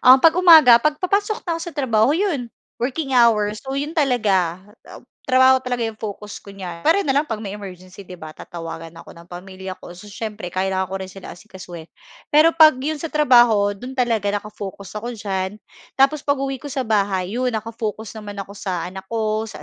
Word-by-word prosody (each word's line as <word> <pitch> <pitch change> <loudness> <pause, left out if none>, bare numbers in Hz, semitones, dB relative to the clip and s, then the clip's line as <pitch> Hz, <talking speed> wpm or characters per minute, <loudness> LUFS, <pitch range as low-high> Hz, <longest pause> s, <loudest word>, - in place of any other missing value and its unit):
Um, 255 +1 +8
'pag 325 +3 +6
umaga 315 -10 +8
pagpapasok 395 - 0
na 340 - -1
ako 330 - -5
sa 340 0 -6
trabaho 235 -3 +2
'yon 330 - -1 0.3
working 270 +2 -2
hours, 215 -3 +3
so, 270 0 -5
'yon 295 +4 -4
talaga, 205 - +1 0.3
ah, - - -10 0.2
trabaho 260 0 +4
talaga 245 -2 -2
'yong 225 - -5
focus 210 -1 -7
ko 200 - -12
niyan 180 -4 -8
pwera 395 +5 +3
na 270 - +1
lang 285 - +3
'pag 225 - -3
may 205 -2 -6
emergency, 185 -1 -10
'di 180 -2 -11
ba? 155 -1 -10
Tatawagan 165 -1 -8
ako - - -13
ng 170 +1 -15
pamilya 185 +1 -8
ko. 175 - -11
So 205 +3 -13
siyempre 215 -3 -6
kailangan 190 0 -1
ko 195 - -3
rin 190 - -6
sila 195 - -10
asikasuhin. 180 -4 -11 0.4
Pero 305 +2 +5
'pag 315 -3 +7
'yon 305 +1 -2
sa 325 - -4
trabaho 240 -8 +5
do'n 250 +6 -8
talaga 225 -5 0
naka-focus 200 -2 -7
ako 240 +3 -6
diyan. 200 -1 -4 0.3
Tapos 275 +2 +2
pag-uwi 275 -2 -1
ko - - -10
sa 275 -2 -2
bahay, 200 -2 -1
'yon 250 -2 0
naka-focus 220 0 -5
naman 205 -1 -8
ako 195 - -16
sa 185 -4 -3
anak 190 +1 -8
ko, 220 0 -1
sa 150 -7 -10
220 Hz, 195 wpm, -21 LUFS, 190-265 Hz, 0.4 s, Um